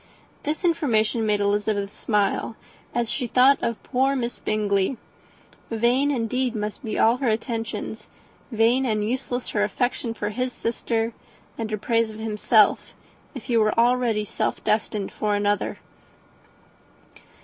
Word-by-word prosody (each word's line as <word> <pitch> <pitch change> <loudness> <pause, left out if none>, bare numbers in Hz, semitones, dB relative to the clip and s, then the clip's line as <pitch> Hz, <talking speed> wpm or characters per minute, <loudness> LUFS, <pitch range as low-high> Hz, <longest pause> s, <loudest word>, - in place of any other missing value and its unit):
This 310 +5 -3
information 235 -9 +2
made 210 -1 +2
Elizabeth 205 0 0
smile, 210 +1 0 0.4
as 235 -2 -1
she 245 +2 -2
thought 260 +3 +5
of 235 -2 -2
poor 270 +1 +1
Miss 240 -2 -3
Bingley. 210 +2 0 0.7
Vain 240 +5 +2
indeed 250 -1 -1
must 210 +5 -4
be 220 - -3
all 230 +2 +4
her 255 -2 0
attentions, 225 +1 -3 0.4
vain 230 +3 +3
and 215 -4 0
useless 250 0 -2
her 205 - +1
affection 230 +2 -1
for 210 -1 -2
his 250 +4 -2
sister 230 0 -2 0.4
and 225 -2 -4
her 215 - -1
praise 230 +1 +1
of 215 - -9
himself, 215 0 +2 0.4
if 260 - -6
he 240 - -1
were 215 0 +2
already 235 -3 +2
self - - -2
destined 210 -1 -1
to 215 - -1
another. 205 0 0
225 Hz, 140 wpm, -24 LUFS, 210-250 Hz, 0.7 s, thought